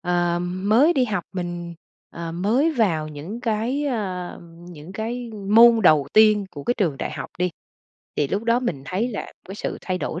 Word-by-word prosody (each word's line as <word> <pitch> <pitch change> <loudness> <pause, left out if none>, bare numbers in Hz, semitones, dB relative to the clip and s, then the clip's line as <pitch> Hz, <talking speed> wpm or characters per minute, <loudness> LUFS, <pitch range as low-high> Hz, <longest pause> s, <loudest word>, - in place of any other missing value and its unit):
ờ, 175 -1 +1
mới 205 - +3
đi 265 -6 +2
học, 215 -4 -2
mình, 175 -2 -5 0.4
ờ, 165 -1 -6
mới 225 - +2
vào 170 - +1
những 155 +10 -7
cái, 235 +6 -1
a, 190 -9 -3 0.3
những 160 +1 -11
cái 230 +3 -4 0.2
môn 230 +1 +7
đầu 155 -6 +5
tiên 215 -1 +5
của 145 - -9
cái 245 - +1
trường 170 - 0
đại - - -3
học - - -6
đi, 180 0 +1 0.7
thì 145 - +1
lúc 200 +7 -1
đó 235 +1 +3
mình 170 - -3
thấy 190 - -1
là 215 -5 -6 0.2
cái 195 - -6
sự - - -4
thay 185 -1 -3
đổi 170 - -4
195 Hz, 190 wpm, -23 LUFS, 175-230 Hz, 0.7 s, môn